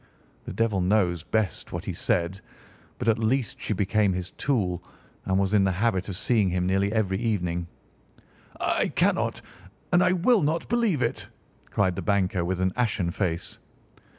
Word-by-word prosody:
The - - -6
devil 110 -4 +1
knows 90 -3 +2
best 110 +1 -2
what - - -5
he - - -3
said, 90 +3 -1 0.6
but 125 - -4
at 115 -1 +3
least 115 0 0
she - - -3
became 100 0 +2
his 90 0 -4
tool 95 -11 -1 0.4
and 95 0 +1
was 100 +1 +1
in 100 -2 +5
the 95 - +2
habit 95 -1 0
of 95 - -4
seeing 105 0 +2
him 90 0 0
nearly 95 +2 +1
every 100 -4 0
evening." 90 -7 -1 0.9
"I - - +1
cannot, - - 0 0.5
and 175 - +6
I 180 0 +4
will 200 +5 +3
not, 160 +3 0
believe 220 - +1
it!" 115 - -2 0.4
cried 95 -3 +1
the - - -3
banker 95 -3 +1
with 90 +1 -2
an 95 0 +1
ashen 110 -8 0
face. 90 -3 -3
100 Hz, 170 wpm, -26 LUFS, 90-115 Hz, 0.9 s, and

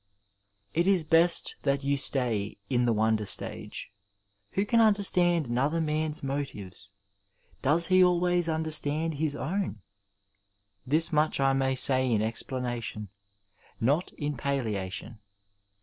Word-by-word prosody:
It 170 +3 0
is 190 -4 +2
best 165 +2 +3
that 140 0 -1
you 140 +1 0
stay 120 -7 +2
in 120 -1 +1
the - - +2
wonder 110 0 0
stage. - - -1 0.6
Who 195 - 0
can 230 +2 +1
understand 180 -6 +3
another 135 +7 -1
man's 155 -1 -2
motives? 105 -8 -6 0.7
Does 155 +5 +3
he 185 +1 +4
always 175 -1 +1
understand 160 0 +1
his 150 -2 -1
own? 155 - -4 1.0
This 160 +4 0
much 150 0 +1
I 135 0 +2
may 135 0 0
say 130 -1 +4
in 110 -2 +1
explanation 115 -3 -4 0.7
—not 145 +9 0
in 145 -1 -4
palliation. 110 -5 -4
140 Hz, 120 wpm, -27 LUFS, 120-165 Hz, 1.0 s, he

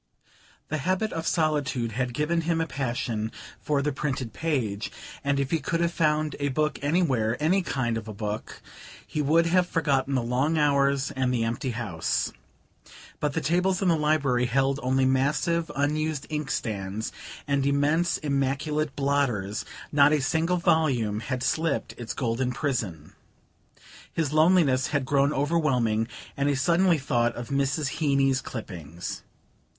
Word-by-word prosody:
The 155 - -1
habit 185 +8 0
of 165 0 -3
solitude 145 -7 0
had 120 +2 -2
given 165 +4 +1
him 165 0 0
a 165 - +1
passion 120 -6 -2 0.3
for 145 -2 0
the 150 - 0
printed 135 -4 -3
page, 120 -11 -2 0.3
and 140 0 +1
if 135 -1 -1
he 165 - +2
could 165 +4 -1
have 170 0 +1
found 155 -2 +1
a 145 - 0
book 150 +3 0
anywhere 135 -7 +1
any 175 +6 +3
kind 120 -9 -1
of 110 - -12
a - - -5
book 105 +1 -5 0.4
he 150 - -2
would 160 +4 +3
have 180 +1 +3
forgotten 140 -4 +1
the 125 - +1
long 130 +7 +1
hours 140 -2 +2
and 130 -2 0
the 120 -2 +1
empty 120 +4 -2
house. 105 -9 -2 0.9
But 150 -1 -1
the - - -1
tables 180 +4 +2
in 185 - +3
the 170 - +4
library 145 -5 +2
held 135 +2 +1
only 130 +1 +2
massive 150 +6 +1
unused 150 +1 0
inkstands 110 -8 -3 0.4
and 140 -1 +1
immense 145 +4 +2
immaculate 140 +1 -1
blotters; 135 -8 0 0.3
not 145 0 +5
a 150 - +3
single 160 +6 +1
volume 130 -11 +2
had 130 +2 -3
slipped 160 -2 0
its 120 -2 -5
golden 125 +1 -1
prison. 115 - -3 1.0
His 155 -3 -1
loneliness 155 -5 +4
had 145 -3 -1
grown 140 +1 +2
overwhelming, 135 -8 +1 0.3
and 140 +1 +1
he 145 - +2
suddenly 170 +5 +3
thought 120 -4 0
of 120 -1 -6
Mrs. 140 +1 0
Heeny's 140 -3 +2
clippings. 85 - -7
140 Hz, 150 wpm, -26 LUFS, 125-155 Hz, 1.0 s, not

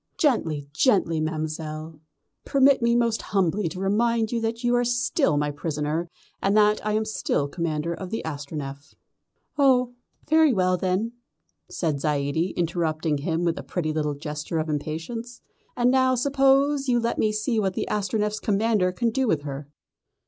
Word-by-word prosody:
"Gently, 165 - +1
gently, 170 - +2
Ma'm'selle; 155 0 -4 0.4
permit 275 -1 +4
me 235 0 +3
most 235 -2 +1
humbly 190 -1 0
to 185 - -7
remind 220 +3 +1
you 235 -1 -1
that 230 +2 -2
you 240 0 +2
are 245 - +3
still 240 - +1
my 145 0 0
prisoner, 150 +2 -3 0.3
and 200 +2 +2
that 210 0 +4
I 210 0 0
am 215 +1 +1
still 145 -9 -1
Commander 165 +1 -2
of 185 +2 -7
the 225 - -3
Astronef." 145 -1 -6 0.6
"Oh, 255 -3 +4 0.3
very 315 -2 +5
well 185 -2 +2
then," 190 +5 -1 0.6
said 155 -5 -1
Zaidie, 150 +4 0
interrupting 160 -3 0
him 165 +3 -1
with 170 0 0
a - - -7
pretty 155 -4 -2
little 150 -2 -1
gesture 150 +2 -4
of 155 0 -1
impatience, 165 +11 -4 0.4
"and 245 0 +3
now 260 0 +3
suppose 275 +2 +3
you 240 -1 +3
let 235 0 -1
me 215 - +2
see 215 +2 0
what 190 -3 0
the - - -2
Astronef's 210 +1 -1
commander 210 -2 +1
can 230 +5 0
do 265 +2 0
with 155 -8 +1
her." 140 0 -6
190 Hz, 165 wpm, -25 LUFS, 155-235 Hz, 0.6 s, very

